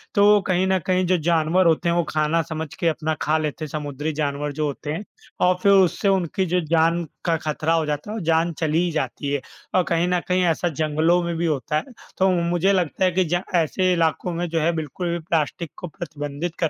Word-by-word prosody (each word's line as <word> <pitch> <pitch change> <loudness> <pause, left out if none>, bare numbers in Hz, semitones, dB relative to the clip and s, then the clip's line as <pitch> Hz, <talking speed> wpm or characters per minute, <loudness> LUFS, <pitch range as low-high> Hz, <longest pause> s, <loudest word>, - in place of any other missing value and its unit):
तो 200 -1 +5
वो 210 0 +6
कहीं 185 0 +2
न 190 0 +2
कहीं 185 0 +2
जो 180 +1 +2
जानवर 165 +2 +2
होते 165 +1 +2
हैं 170 - +1
वो 175 - +2
खाना 155 +2 +1
समझ 160 0 -3
के 170 - +1
अपना 160 -1 0
खा 155 +2 +2
लेते 155 0 -3
हैं, - - -9
समुद्री 145 +1 -4
जानवर 145 -1 -2
जो 155 +1 -1
होते 145 +1 -5
हैं। 165 +7 -4 0.4
और 180 0 +4
फिर 200 - +5
उससे 190 0 +3
उनकी 190 0 +1
जो 180 +1 +1
जान 165 +2 +2 0.2
का 170 -2 +2
खतरा 155 +1 -1
हो 165 -1 +1
जाता 150 +6 -3
है 220 - -4
वो 210 - -4
जान 165 +1 +2
चली 160 +1 +1
ही 175 - -1
जाती 150 -2 -3
है, 145 - -1 0.3
और 185 - +4
कहीं 170 +1 +2
न 180 0 +1
कहीं 180 0 +2
ऐसा 175 0 +1
जंगलों 160 +3 +1
में 170 0 -2
भी 170 - -1
होता 150 -1 -1
है, - - -1 0.3
तो 190 0 +3
मुझे 175 +3 +2
लगता 180 -1 0
है 185 - +3
कि 185 +1 +1
जा 175 +2 -1
ऐसे 180 +3 +2
इलाकों 165 +1 0
में 175 +1 -2
जो 165 0 0
है 165 +2 +2
बिल्कुल 170 +3 -3
प्लास्टिक 160 0 -1
को 180 - -6
प्रतिबंधित 155 -1 -5
कर 165 - +1
165 Hz, 235 wpm, -23 LUFS, 155-180 Hz, 0.4 s, वो